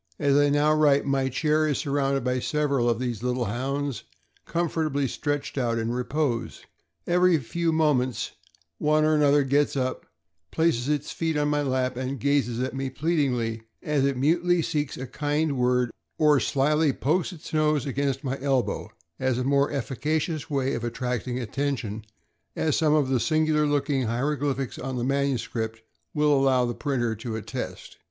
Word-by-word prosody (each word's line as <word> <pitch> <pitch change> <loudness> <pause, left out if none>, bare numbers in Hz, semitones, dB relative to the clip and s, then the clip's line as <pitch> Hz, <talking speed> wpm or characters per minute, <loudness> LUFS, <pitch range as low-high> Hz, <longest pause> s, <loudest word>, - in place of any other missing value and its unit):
As 140 -2 +2
I 145 0 +4
now 145 +1 +3
write, 145 -2 +4
my 135 -1 +1
chair 155 +3 +1
is 145 -4 0
surrounded 140 -2 0
by 125 0 0
several 140 -3 +1
of 115 - +1
these 120 -3 -3
little 125 0 -1
Hounds, 135 +4 -2 0.4
com 170 +1 0
fortably 150 -4 -1
stretched 145 +1 -3
out 120 -2 0
in 115 0 -1
repose. 125 0 -2 0.4
Every 180 0 +4
few 165 +5 -1
moments 145 -6 +1 0.5
one 155 0 +3
or 155 - +3
another 145 -1 +4
gets 140 +1 +1
up, 130 -1 -2 0.4
places 155 -6 +1
its 150 -1 -1
feet 160 -2 -1
on 145 0 +1
my 145 0 +1
lap, 130 -2 -1
and 130 +1 -3
gazes 135 -3 +1
at 130 - -2
me 135 0 -2
pleadingly, 130 -7 0 0.2
as 150 -2 +1
it 140 -1 +1
mutely 170 +5 +2
seeks 150 -3 -2
a 130 - -5
kind 145 +3 -1
word, 125 -1 +1 0.3
or 150 -2 +5
slyly 145 +5 +2
pokes 165 +10 0
its 165 -1 -11
nose 150 -3 +2
against 140 0 -1
my 135 0 -3
elbow 135 -3 0 0.3
as 130 -2 +1
a 125 - -1
more 140 +2 +2
efficacious 150 +1 -2
way 135 -1 0
of 115 - -3
attracting 125 +1 -2
attention, 125 -3 -3 0.5
as 155 -3 +1
some 155 -1 +3
of 145 -4 +2
the 130 -2 +2
singular 155 +2 +2
looking 140 -3 0
hieroglyphics 135 +2 -1
on 130 0 -4
the 120 - -2
manuscript 115 -5 -1 0.3
will 150 0 +3
allow 135 -2 +3
the 120 - -2
printer 120 -4 -1
to 110 +1 -5
attest. 110 - -6
140 Hz, 165 wpm, -26 LUFS, 125-150 Hz, 0.5 s, or